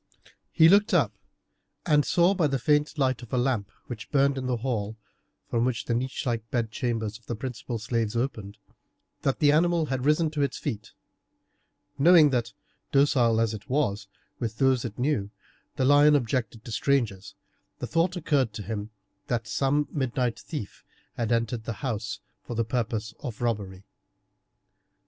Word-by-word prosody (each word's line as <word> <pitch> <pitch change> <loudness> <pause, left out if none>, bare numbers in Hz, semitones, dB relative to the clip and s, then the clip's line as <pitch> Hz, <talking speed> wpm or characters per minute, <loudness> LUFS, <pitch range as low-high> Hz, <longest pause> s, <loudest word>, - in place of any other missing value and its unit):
He 160 - +6
looked 200 +4 +5
up, - - +3 0.7
and 150 -3 +4
saw 175 +5 +3
by 175 -5 +2
the 135 -1 0
faint 150 +3 +1
light 130 -3 +1
of 120 - -12
a 125 - 0
lamp 120 -5 0 0.2
which 120 -2 -8
burned 140 -1 +3
in 130 -1 -3
the 125 -1 0
hall, 110 -3 -3 0.5
from 115 -1 0
which 125 -3 -1
the 120 - -1
niche 130 +3 -2
like 115 -2 -2
bed 115 -3 -1
chambers 115 -2 -2
of 115 - -31
the 120 - -3
principal 120 0 -5
slaves 115 0 -2
opened, 110 -5 -3 0.6
that 135 - 0
the 145 -2 +4
animal 170 +1 +3
had 130 -1 -2
risen 150 +2 +2
to 150 -2 -2
its 140 - 0
feet. 115 -8 -5 1.1
Knowing 160 -1 +7
that, 125 -3 0 0.4
docile 125 -5 +3
as 115 -1 +1
it 105 +3 -9
was 115 -8 0 0.3
with 115 -2 -3
those 130 -2 +3
it - - -6
knew, 125 -6 0 0.5
the 130 - +1
lion 145 +2 +6
objected 115 -4 -1
to 115 - -7
strangers, 110 -6 0 0.4
the - - -4
thought 170 +3 +1
occurred 145 -9 +1
to 105 - -6
him 105 +1 -4 0.4
that 115 -2 -1
some 145 +4 +1
midnight 125 -3 -1
thief 135 -11 -7 0.3
had 115 -1 -2
entered 115 -1 0
the 115 - -3
house 110 -4 -3 0.2
for 120 - -7
the 115 0 0
purpose 115 -2 -2
of 120 -6 -6
robbery. 100 -6 -2
125 Hz, 170 wpm, -27 LUFS, 115-145 Hz, 1.1 s, Knowing